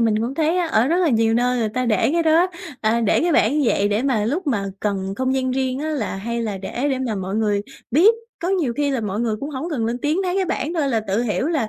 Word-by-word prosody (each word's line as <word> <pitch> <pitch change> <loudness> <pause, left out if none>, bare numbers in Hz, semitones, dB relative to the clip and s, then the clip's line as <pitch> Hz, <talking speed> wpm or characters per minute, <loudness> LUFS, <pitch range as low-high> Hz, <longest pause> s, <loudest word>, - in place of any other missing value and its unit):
mình 220 -2 +2
cũng 245 +4 -2
thấy 320 +3 +1
á 350 - +1
ở 240 -6 +2
rất 335 +4 +2
là 345 - +3
nhiều 225 -2 +2
nơi 250 +1 +1
người 220 -2 0
ta 255 +3 -2
để 215 +3 +2
cái 340 0 +2
đó, 325 +3 +4 0.3
à, 225 +2 +1
để 225 - +2
cái 340 0 +1
bảng 275 +6 +3
như 255 - +2
vậy 205 - +2
để 210 +4 0
mà 240 -7 +1
lúc 305 - -2
mà 215 -8 0 0.2
cần 195 -2 -2
không 260 0 0
gian 260 -1 0
riêng 260 0 -1
á 310 - -3
là 235 -10 -2
hay 235 +4 -3
là 205 -4 -3
để 245 +8 -3
để 260 - 0
mà 245 -5 -2
mọi 190 0 -4
người 205 -2 +1 0.3
biết. 370 - +5 0.3
Có 350 - -1
nhiều 340 -11 +1
khi 290 -1 +1
là 265 - -1
mọi 210 0 -3
người 225 -3 0
cũng 285 - -4
hổng 300 +5 -4
cần 240 -7 -1
lên 240 +2 -2
tiếng 300 +6 0
thấy 365 +1 -1
cái 385 - +2
bảng 335 -1 -2
thôi 300 -4 +1
là 230 -4 +1
tự 215 +2 -1
hiểu 245 +4 -1
là 285 -10 0
250 Hz, 295 wpm, -21 LUFS, 220-300 Hz, 0.3 s, biết